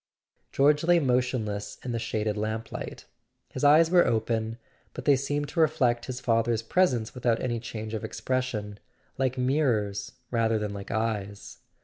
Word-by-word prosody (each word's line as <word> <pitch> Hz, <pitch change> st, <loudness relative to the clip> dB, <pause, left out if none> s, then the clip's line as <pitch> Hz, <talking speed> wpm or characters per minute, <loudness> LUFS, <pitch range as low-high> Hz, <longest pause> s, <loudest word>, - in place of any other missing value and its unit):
George 145 Hz, +2 st, +3 dB
lay 175 Hz, +1 st, +5 dB
motionless 125 Hz, -7 st, -1 dB
in 125 Hz, -, -3 dB
the 115 Hz, -, -1 dB
shaded 110 Hz, -1 st, -1 dB
lamplight: 110 Hz, +1 st, -4 dB, 0.4 s
his -, -, -6 dB
eyes 155 Hz, +3 st, +6 dB
were 180 Hz, -1 st, +6 dB
open, 110 Hz, 0 st, -1 dB, 0.4 s
but -, -, -7 dB
they 145 Hz, -, +6 dB
seemed 145 Hz, +2 st, -2 dB
to -, -, -4 dB
reflect 135 Hz, -7 st, +2 dB
his 130 Hz, -1 st, -4 dB
father's 115 Hz, -1 st, +1 dB
presence 125 Hz, -5 st, +1 dB
without 120 Hz, -3 st, 0 dB
any 120 Hz, -2 st, -2 dB
change 110 Hz, -1 st, -6 dB
of 110 Hz, -, -3 dB
expression, 115 Hz, -6 st, -3 dB, 0.4 s
like 130 Hz, -1 st, 0 dB
mirrors 120 Hz, -7 st, 0 dB, 0.2 s
rather 115 Hz, -2 st, +2 dB
than 105 Hz, -1 st, -3 dB
like 100 Hz, -1 st, -7 dB
eyes. 105 Hz, -2 st, -3 dB
120 Hz, 150 wpm, -27 LUFS, 110-135 Hz, 0.4 s, eyes